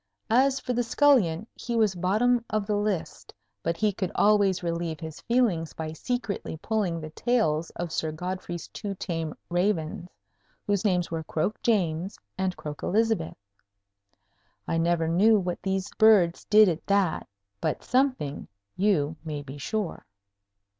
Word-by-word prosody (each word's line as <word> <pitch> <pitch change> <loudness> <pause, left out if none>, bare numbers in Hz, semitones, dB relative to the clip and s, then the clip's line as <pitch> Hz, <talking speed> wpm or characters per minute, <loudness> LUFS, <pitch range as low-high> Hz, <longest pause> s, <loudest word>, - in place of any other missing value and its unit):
As 265 +3 +4
for 250 - -3
the 245 - +1
scullion, 230 - +3
he 240 - -4
was 215 -4 +3
bottom 215 +7 +2
of 215 -2 -1
the 210 0 0
list; 205 -4 -3 0.3
but 165 0 -1
he 210 +2 +1
could 185 -1 -3
always 200 -3 +3
relieve 170 -2 -2
his 160 -2 -8
feelings 220 -10 +1
by 160 -1 -5
secretly 215 - -3
pulling 190 -2 -1
the 155 -1 -7
tails 170 -9 +1
of 170 -1 -4
Sir 160 0 -1
Godfrey's 175 +1 -5
two 200 -2 -5
tame 165 -4 -4
ravens, 175 -1 -1 0.6
whose 200 -2 0
names 180 -5 +1
were 165 -1 -2
Croak 155 +7 -2
James 185 -4 0 0.2
and 190 -1 -2
Croak 150 -1 -7
Elizabeth. 220 -4 0 1.3
I 165 - 0
never 165 -1 +1
knew 205 +7 +5
what 180 -3 -2
these 190 0 -1
birds 200 -6 +5
did 215 0 +7
at 170 -2 -1
that; 200 -4 +1 0.3
but - - -1
something, 255 - 0 0.3
you 165 -6 +1
may 150 -3 -5
be 140 +1 -9
sure. 205 - -3
185 Hz, 145 wpm, -27 LUFS, 165-215 Hz, 1.3 s, did